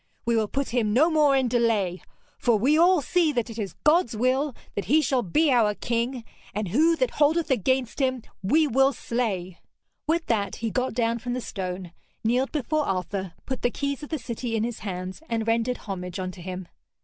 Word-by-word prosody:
We 235 - +2
will 220 -1 +2
put 275 +5 -2
him 225 -3 +1
no 310 +8 +4
more 300 -3 +4
in 265 -2 +2
delay, 225 -7 +1 0.4
for 235 -3 +3
we 265 +9 +3
all 350 +1 +5
see 340 +2 +2
that 240 -2 -1
it 225 - -7
is 195 -5 -4
God's 305 -6 +3
will 260 +3 +1 0.2
that 200 - -3
he 295 - +4
shall 265 -4 +1
be 285 - +2
our 220 -4 +3
King, 235 +2 -2 0.3
and 210 -3 -2
who 320 - +4
that 255 -6 0
holdeth 310 +1 +2
against 260 +2 +1
him, 260 -3 0 0.2
we 305 +12 +3
will 270 +1 +3
slay.' 205 -8 -3 0.5
With 330 +1 +1
that 200 -4 0
he 225 -1 -3
got 255 0 -1
down 235 -1 +1
from 245 +2 -4
the 255 - -2
stone, 185 -5 -5 0.3
kneeled 250 +4 +1
before 305 +1 -1
Arthur, 190 -1 -2
put 260 -1 -4
the 245 - +2
keys 280 +2 -3
of 295 - -8
the 315 - -1
city 235 -2 -4
in 220 - +1
his 235 -1 -3
hands, 185 +2 -5
and 225 -1 -1
rendered 230 +2 +1
homage 180 -3 -6
unto 185 -1 -5
him. 185 0 -6
240 Hz, 200 wpm, -26 LUFS, 210-275 Hz, 0.5 s, all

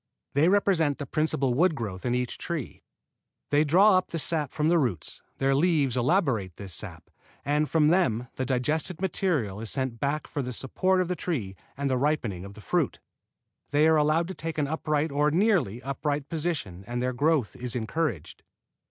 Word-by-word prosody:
They 150 +5 +4
represent 185 -7 +2
the 145 - -5
principal 140 -3 0
wood 165 +5 +3
growth 105 -4 -4
in 120 - +1
each 125 -1 -2
tree. 165 -7 -5 0.7
They 145 +1 +4
draw 185 +6 +5
up 185 - -8
the 165 - -4
sap 155 -3 -1
from 150 0 0
the 170 +1 +4
roots, 115 - -2 0.2
their 135 0 +2
leaves 145 -4 +2
elaborate 125 - +1
this 100 -3 -8
sap, - - -7 0.3
and 150 +1 +1
from 155 -2 +4
them 125 - +2
the 130 - -2
digested 150 +7 0
material 160 - -1
is 115 - -5
sent 130 -4 -2
back 145 +2 -1
for 145 - -4
the 125 -1 -4
support 185 +10 +1
of 180 - -1
the 180 - -1
tree 120 - -3 0.2
and 140 0 -1
the 130 -1 +1
ripening 125 -11 0
of 100 0 -10
the 105 - -11
fruit. - - 0 0.7
They 150 +2 +4
are 160 - +5
allowed 155 +3 +2
to - - -4
take 160 -1 -5
an 150 - +1
upright 155 0 -1
or 145 +1 +2
nearly 160 - +1
upright 145 +1 -2
position 150 - -3
and 120 0 -3
their 125 +1 -1
growth 145 -3 +1
is 125 -1 -5
encouraged. 120 - -2
145 Hz, 185 wpm, -27 LUFS, 125-165 Hz, 0.7 s, draw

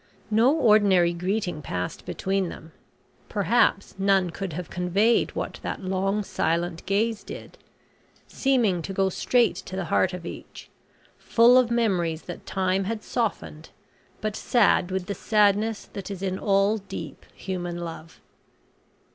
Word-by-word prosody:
No 230 +5 +5
ordinary 200 - +4
greeting 180 -2 -2
passed 90 - -5
between 190 -1 -1
them. 160 0 -11 0.6
Perhaps - - +2
none 195 -2 +2
could 190 -1 -5
have 175 0 -6
conveyed 195 +6 +2
what - - -4
that - - -5
long 195 +2 0
silent 170 -2 -1
gaze 210 +2 0
did; - - -10 0.7
seeming 235 -10 +1
to 195 - -6
go 195 0 +1
straight 240 +5 +2
to 185 - -7
the 190 -2 -2
heart 185 - +3
of 180 -2 -7
each, - - -10 0.5
full 235 +2 +5
of 255 -2 +5
memories 185 -9 0
that 175 - -9
time 190 0 0
had 215 +1 -3
softened, 200 -9 -3 0.5
but 215 -1 -2
sad 210 -7 +2
with 190 -1 -2
the 200 - -3
sadness 210 +2 +2
that 195 -1 -6
is 195 -1 -6
in 190 -1 -2
all 200 +2 +2
deep 165 -6 -8
human 175 -2 -4
love. 165 -1 -8
195 Hz, 140 wpm, -25 LUFS, 175-215 Hz, 0.7 s, No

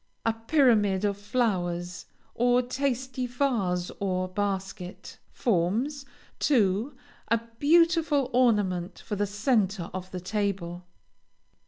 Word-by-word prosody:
A 225 - +3
pyramid 225 -6 +3
of 200 -1 +1
flowers, 180 -6 -2 0.3
or 245 +1 +3
tasty 255 -1 -2
vase 225 -9 0
or 185 -2 -1
basket, 190 -1 -4
forms, 235 - 0 0.3
too, 225 0 +2 0.3
a 230 +1 +2 0.2
beautiful 315 -3 +3
ornament 205 -7 +2
for 210 - -3
the 205 +1 0
centre 205 -3 0
of 185 0 -6
the 185 - -5
table. 185 -3 -3
210 Hz, 105 wpm, -27 LUFS, 185-250 Hz, 0.3 s, A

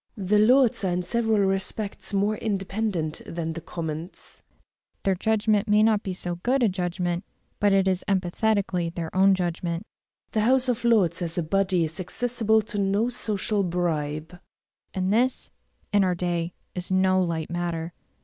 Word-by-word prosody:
The 205 +1 +2
Lords 245 0 +4
are 190 - +1
in 180 0 -1
several 220 +2 +1
respects 195 +2 -1
more 205 +2 +1
independent 195 -5 -2
than 165 -1 -3
the 170 - -6
Commons; 165 +1 -7 0.6
their 195 - +2
judgment 215 +2 +1
may 210 0 +4
not 215 -2 +3
be 195 - -4
so 175 -1 -4
good 255 +4 +2
a 225 - +4
judgment, 175 -1 -2 0.4
but 205 -1 +3
it 195 -1 +3
is 185 -1 0
emphatically 190 -1 0
their 165 0 -6
own 195 +1 +5
judgment. 175 0 -3 0.5
The 215 - +1
House 255 +3 +3
of 245 -1 -1
Lords, 220 -8 +3
as 170 0 -2
a 175 - +1
body, 185 +1 +1
is 160 +2 -3
accessible 220 +3 +1
to 205 -1 -3
no 200 +4 +1
social 215 -3 0
bribe. 165 -2 -2 0.5
And 190 +1 -1
this, 250 +3 0 0.4
in 205 -1 +5
our 180 -1 +1
day, 175 -1 -2 0.2
is 180 0 -5
no 185 0 +3
light 165 -2 -2
matter. 170 -1 -3
190 Hz, 160 wpm, -25 LUFS, 175-215 Hz, 0.6 s, own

